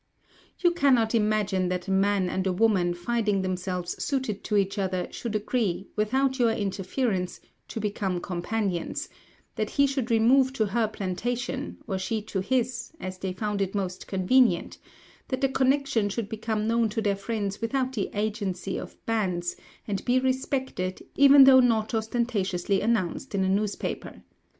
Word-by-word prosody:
"You 350 Hz, -, +3 dB
cannot 260 Hz, -9 st, +3 dB
imagine 210 Hz, -4 st, +1 dB
that 180 Hz, +1 st, -3 dB
a -, -, -2 dB
man 195 Hz, 0 st, +2 dB
and 190 Hz, +1 st, -1 dB
a -, -, +2 dB
woman, 185 Hz, -4 st, +2 dB
finding 210 Hz, +1 st, 0 dB
themselves 180 Hz, -1 st, -3 dB
suited 260 Hz, -8 st, -2 dB
to 210 Hz, -, +1 dB
each 195 Hz, +1 st, 0 dB
other, 185 Hz, -2 st, -1 dB
should 230 Hz, -3 st, -5 dB
agree, 210 Hz, -3 st, -1 dB
without 260 Hz, +5 st, +1 dB
your 235 Hz, -2 st, +4 dB
interference, 195 Hz, -1 st, -2 dB, 0.3 s
to -, -, -5 dB
become 200 Hz, -3 st, -2 dB
companions; 180 Hz, 0 st, -2 dB, 0.5 s
that 215 Hz, -1 st, -1 dB
he 280 Hz, -, +3 dB
should 270 Hz, -3 st, -1 dB
remove 255 Hz, +4 st, +4 dB
to 220 Hz, -5 st, +1 dB
her 220 Hz, +2 st, +1 dB
plantation, 240 Hz, +7 st, -3 dB
or 190 Hz, -3 st, -2 dB
she 220 Hz, +4 st, -1 dB
to 200 Hz, -2 st, -3 dB
his, 240 Hz, +4 st, -1 dB
as 185 Hz, -4 st, -6 dB
they 190 Hz, -, -3 dB
found 205 Hz, +2 st, -2 dB
it 195 Hz, +1 st, -1 dB
most 185 Hz, -2 st, -3 dB
convenient; 225 Hz, +7 st, +2 dB, 0.5 s
that 260 Hz, 0 st, -3 dB
the 270 Hz, -, +3 dB
connection 265 Hz, -4 st, +2 dB
should 205 Hz, 0 st, -3 dB
become 220 Hz, -1 st, -2 dB
known 230 Hz, 0 st, +2 dB
to 225 Hz, +2 st, -3 dB
their 200 Hz, -1 st, +2 dB
friends 205 Hz, 0 st, -3 dB
without 260 Hz, +2 st, -1 dB
the 205 Hz, -6 st, -2 dB
agency 200 Hz, -3 st, -2 dB
of -, -, -9 dB
banns, 180 Hz, -6 st, -1 dB, 0.3 s
and 200 Hz, -2 st, -2 dB
be 250 Hz, +1 st, +3 dB
respected, 260 Hz, -7 st, -2 dB
even 280 Hz, 0 st, +8 dB
though 265 Hz, -1 st, +8 dB
not 230 Hz, -3 st, +2 dB
ostentatiously 215 Hz, -5 st, 0 dB
announced 220 Hz, +1 st, -1 dB
in 190 Hz, -, +1 dB
a -, -, +1 dB
newspaper. 200 Hz, +2 st, -2 dB
215 Hz, 160 wpm, -27 LUFS, 190-245 Hz, 0.5 s, even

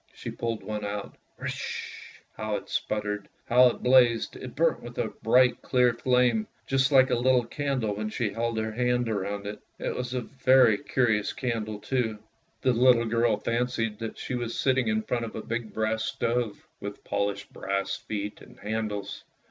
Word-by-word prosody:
She -, -, -6 dB
pulled 115 Hz, -2 st, -3 dB
one 105 Hz, -1 st, -4 dB
out, 100 Hz, 0 st, -4 dB
" -, -, -37 dB
risch," -, -, -5 dB, 0.4 s
how 110 Hz, 0 st, -2 dB
it -, -, -6 dB
spluttered, 105 Hz, -1 st, -2 dB, 0.2 s
how 125 Hz, +1 st, +6 dB
it 120 Hz, -, -2 dB
blazed! 125 Hz, -2 st, +4 dB
It -, -, -8 dB
burnt -, -, +2 dB
with -, -, -10 dB
a -, -, 0 dB
bright 125 Hz, +3 st, +4 dB
clear 125 Hz, -2 st, +3 dB
flame, 125 Hz, -2 st, +2 dB, 0.2 s
just 135 Hz, 0 st, +2 dB
like 130 Hz, -1 st, +6 dB
a -, -, +4 dB
little 125 Hz, 0 st, +3 dB
candle 130 Hz, -4 st, -1 dB
when 105 Hz, +1 st, -3 dB
she 110 Hz, -1 st, -1 dB
held 115 Hz, +1 st, -2 dB
her 110 Hz, 0 st, -1 dB
hand 125 Hz, +1 st, +1 dB
round 100 Hz, -1 st, -2 dB
it. 105 Hz, +1 st, -5 dB, 0.2 s
It -, -, -3 dB
was 125 Hz, 0 st, -3 dB
a 125 Hz, -, 0 dB
very 130 Hz, -4 st, +4 dB
curious 110 Hz, -5 st, +1 dB
candle 110 Hz, -4 st, -2 dB
too. 110 Hz, -1 st, -1 dB, 0.5 s
The 130 Hz, -2 st, +4 dB
little 120 Hz, 0 st, +5 dB
girl 115 Hz, -1 st, +2 dB
fancied 115 Hz, -1 st, -1 dB
that 115 Hz, -1 st, -5 dB
she -, -, -5 dB
was 120 Hz, -2 st, -3 dB
sitting 130 Hz, -3 st, +2 dB
in 110 Hz, 0 st, +1 dB
front 120 Hz, 0 st, -1 dB
of 110 Hz, -, -8 dB
a 110 Hz, -, -5 dB
big 115 Hz, -1 st, -3 dB, 0.3 s
stove 120 Hz, -3 st, -1 dB
with 100 Hz, 0 st, -7 dB
polished 100 Hz, -1 st, -2 dB
brass 100 Hz, 0 st, -2 dB
feet 105 Hz, -1 st, -5 dB
and -, -, -15 dB
handles. 105 Hz, -2 st, -3 dB
115 Hz, 180 wpm, -27 LUFS, 105-125 Hz, 0.5 s, how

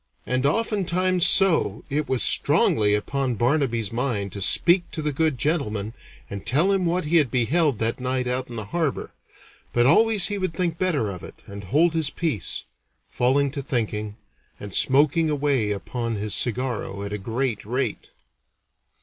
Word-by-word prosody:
And 130 Hz, +2 st, 0 dB
oftentimes 185 Hz, -2 st, +1 dB
so 165 Hz, -, +4 dB
it 145 Hz, +1 st, -3 dB
was 130 Hz, -4 st, +1 dB
strongly 105 Hz, -2 st, +4 dB
upon 130 Hz, +4 st, -2 dB
Barnaby's 120 Hz, -3 st, -1 dB
mind 115 Hz, -6 st, -2 dB
to 100 Hz, -, -6 dB
speak 175 Hz, -, +3 dB
to 160 Hz, -, -4 dB
the 150 Hz, -1 st, -1 dB
good 155 Hz, -1 st, 0 dB
gentleman 115 Hz, -9 st, -2 dB, 0.3 s
and 100 Hz, -1 st, -8 dB
tell 150 Hz, -, +2 dB
him 190 Hz, -3 st, 0 dB
what 175 Hz, 0 st, -1 dB
he 165 Hz, +3 st, +2 dB
had 145 Hz, -6 st, +2 dB
beheld 135 Hz, +4 st, +1 dB
that 115 Hz, +3 st, -1 dB
night 130 Hz, 0 st, -1 dB
out 125 Hz, +1 st, -2 dB
in 120 Hz, -, -10 dB
the 110 Hz, -2 st, -4 dB
harbor; 155 Hz, +5 st, -3 dB, 0.6 s
but 120 Hz, 0 st, +2 dB
always 215 Hz, -, +5 dB
he 205 Hz, -1 st, -3 dB
would 185 Hz, -4 st, -3 dB
think 170 Hz, -2 st, -2 dB
better 150 Hz, -, -1 dB
of 90 Hz, -3 st, -9 dB
it -, -, -13 dB
and 100 Hz, 0 st, -10 dB
hold 155 Hz, -, +2 dB
his 160 Hz, -4 st, 0 dB
peace, 145 Hz, -, -3 dB, 0.5 s
falling 135 Hz, +3 st, +1 dB
to 140 Hz, -, -4 dB
thinking, 110 Hz, -5 st, -3 dB, 0.4 s
and 105 Hz, -2 st, -9 dB
smoking 150 Hz, -, +3 dB
away 140 Hz, -7 st, 0 dB
upon 115 Hz, +4 st, -4 dB
his 105 Hz, 0 st, -3 dB
cigarro 120 Hz, -5 st, -2 dB
at 100 Hz, -, -6 dB
a 105 Hz, -, -4 dB
great 115 Hz, +2 st, -3 dB
rate. 125 Hz, +6 st, -4 dB
130 Hz, 165 wpm, -23 LUFS, 110-160 Hz, 0.6 s, always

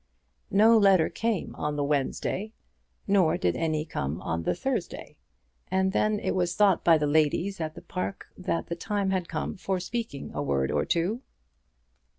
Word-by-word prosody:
No 220 Hz, +4 st, +6 dB
letter 195 Hz, -5 st, +5 dB
came 225 Hz, -5 st, -2 dB
on 150 Hz, 0 st, -2 dB
the 145 Hz, -, 0 dB
Wednesday, 150 Hz, +9 st, -1 dB, 0.5 s
nor 190 Hz, -5 st, +3 dB
did 90 Hz, -1 st, 0 dB
any 155 Hz, -2 st, -1 dB
come 75 Hz, -, -3 dB
on 85 Hz, -1 st, -2 dB
the -, -, 0 dB
Thursday, 265 Hz, +9 st, -4 dB, 0.5 s
and 190 Hz, 0 st, +1 dB
then 215 Hz, +1 st, +1 dB
it -, -, -1 dB
was 175 Hz, -2 st, 0 dB
thought 205 Hz, -3 st, +4 dB
by 165 Hz, -2 st, +6 dB
the 150 Hz, -, 0 dB
ladies 160 Hz, +5 st, +1 dB
at 155 Hz, -1 st, -4 dB
the -, -, -11 dB
Park 185 Hz, +2 st, -4 dB
that 185 Hz, -2 st, -2 dB
the 170 Hz, -, -4 dB
time 200 Hz, +2 st, -1 dB
had 185 Hz, -3 st, -1 dB
come 155 Hz, -2 st, -3 dB
for 190 Hz, 0 st, -2 dB
speaking 220 Hz, -5 st, -5 dB
a 75 Hz, -, -2 dB
word 70 Hz, -2 st, 0 dB
or 75 Hz, -, +1 dB
two. 185 Hz, +9 st, 0 dB
175 Hz, 170 wpm, -27 LUFS, 150-195 Hz, 0.5 s, No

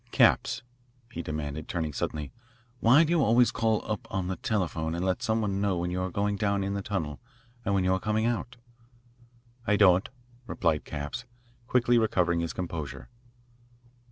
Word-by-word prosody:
"Capps," 115 Hz, -, +3 dB, 0.5 s
he 85 Hz, -, -4 dB
demanded, 75 Hz, -1 st, -4 dB
turning 80 Hz, -4 st, -2 dB
suddenly, 75 Hz, +1 st, -3 dB, 0.5 s
"why 130 Hz, +8 st, +6 dB
do 160 Hz, -, -1 dB
you 170 Hz, -4 st, +4 dB
always 115 Hz, +2 st, +4 dB
call 110 Hz, -1 st, 0 dB
up 110 Hz, +2 st, -4 dB
on 95 Hz, -3 st, -2 dB
the 95 Hz, -, -1 dB
telephone 85 Hz, -6 st, -1 dB
and 85 Hz, +2 st, -2 dB
let 95 Hz, -1 st, 0 dB
some 110 Hz, 0 st, +1 dB
one 100 Hz, -2 st, -1 dB
know 100 Hz, -3 st, +1 dB
when 90 Hz, +1 st, -2 dB
you 90 Hz, +1 st, -1 dB
are 95 Hz, -, -1 dB
going 100 Hz, +2 st, -1 dB
down 100 Hz, -1 st, +1 dB
in 100 Hz, 0 st, -2 dB
the 100 Hz, -, -2 dB
tunnel 80 Hz, -8 st, -3 dB, 0.4 s
and 100 Hz, -1 st, 0 dB
when 95 Hz, -, +2 dB
you 90 Hz, 0 st, +3 dB
are 95 Hz, -, +1 dB
coming 110 Hz, +3 st, 0 dB
out?" 120 Hz, +2 st, -2 dB, 1.1 s
"I 105 Hz, -, +4 dB
don't," 95 Hz, -2 st, +5 dB, 0.4 s
replied 80 Hz, -4 st, 0 dB
Capps, 75 Hz, +11 st, -5 dB, 0.4 s
quickly 120 Hz, -1 st, +3 dB
recovering 90 Hz, -6 st, +2 dB
his 85 Hz, -1 st, -2 dB
composure. 75 Hz, -8 st, -5 dB
95 Hz, 175 wpm, -28 LUFS, 85-110 Hz, 1.1 s, why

